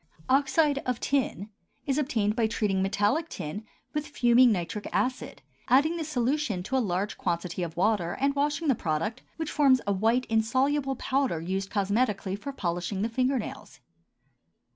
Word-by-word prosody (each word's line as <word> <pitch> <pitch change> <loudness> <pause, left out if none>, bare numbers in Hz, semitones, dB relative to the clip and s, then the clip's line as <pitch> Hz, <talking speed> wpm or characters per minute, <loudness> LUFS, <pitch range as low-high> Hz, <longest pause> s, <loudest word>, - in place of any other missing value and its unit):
OXIDE 280 +2 +3
OF 250 -2 -2
TIN 250 -7 -1 0.3
is 275 +1 +1
obtained 220 -8 0
by 225 -2 +2
treating 210 -4 0
metallic 210 - +1
tin 205 +9 -6 0.3
with 300 -1 -2
fuming 245 -3 +5
nitric 205 +2 -3
acid, 255 0 -2 0.2
adding 295 +6 +4
the 335 - -2
solution 260 - -1
to 245 +8 -3
a - - +4
large 200 -2 -2
quantity 175 0 -2
of 170 -1 -4
water, 185 -3 +1
and 275 +1 +2
washing 295 +3 0
the 275 - +5
product, 210 +5 -2 0.2
which 320 -2 -3
forms 270 -3 +4
a 200 - +1
white 225 +6 +2
insoluble 265 +5 +1
powder 265 - 0
used 190 +4 -3
cosmetically 200 -1 0
for 210 +8 -6
polishing 180 -3 -2
the 225 - 0
finger 255 +3 +1
nails. 225 - -7
230 Hz, 160 wpm, -27 LUFS, 195-275 Hz, 0.3 s, fuming